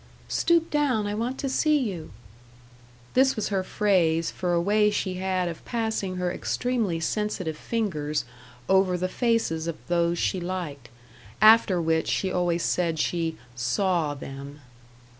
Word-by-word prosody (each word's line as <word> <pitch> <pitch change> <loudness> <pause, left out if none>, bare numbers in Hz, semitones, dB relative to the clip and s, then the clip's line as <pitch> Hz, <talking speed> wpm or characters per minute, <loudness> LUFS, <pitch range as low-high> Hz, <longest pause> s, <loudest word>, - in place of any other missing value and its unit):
"Stoop 335 -1 +2
down; 275 -8 +1
I 205 - -2
want 235 +5 -2
to 275 - -2
see 300 +3 +2
you." 195 - -3 1.0
This 265 +1 +4
was 215 - -2
her 195 -2 0
phrase 175 -6 +1
for 180 -1 -2
a 170 - +3
way 210 +4 +3
she 200 -2 -1
had 185 -1 0
of 165 -2 -6
passing 220 -5 -2
her 180 -1 -1
extremely 225 -10 -1
sensitive 185 -1 -2
fingers 155 - -2 0.4
over 190 -1 +3
the 185 +1 -1
faces 205 -8 0
of 170 - -3
those 170 0 +2
she 185 +2 0
liked. 170 -8 -5 0.5
After 215 -3 +6
which 160 -1 +1
she 190 - 0
always 175 -2 0
said 170 -3 0
she 165 0 -1 0.2
"saw" 165 - 0
them. 140 +1 -9
185 Hz, 145 wpm, -26 LUFS, 165-215 Hz, 1.0 s, After